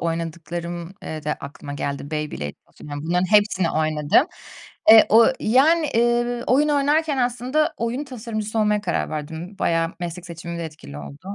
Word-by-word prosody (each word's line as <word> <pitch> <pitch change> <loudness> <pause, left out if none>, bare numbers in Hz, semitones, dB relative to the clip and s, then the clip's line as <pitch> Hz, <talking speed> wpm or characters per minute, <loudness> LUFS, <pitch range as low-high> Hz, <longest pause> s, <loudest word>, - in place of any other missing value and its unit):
oynadıklarım, 170 +1 -4
eee, 155 -1 -6
da 150 - 0
aklıma 145 0 -8
geldi 140 +1 -4
Beyblade, 150 - -3
taso, - - -17
yani, 145 0 -5
bunların 180 +3 0
hepsini 205 -4 +4
oynadım. 155 - +2 0.6
Eee, 220 0 +9
o 225 +1 +7
yani, 305 +8 +4
eee, 240 +1 +1
oyun 290 +4 +3
oynarken 295 0 +2
aslında, 250 +6 0
oyun 235 +5 -2
tasarımcısı 225 -4 -4
olmaya 210 -1 +2
karar 210 - -2
verdim. 160 +5 -6
Bayağı 165 0 0
meslek 175 0 -5
seçimimde 170 0 -6
etkili 150 - -9
oldu. 145 - -9
180 Hz, 150 wpm, -22 LUFS, 160-240 Hz, 0.6 s, Eee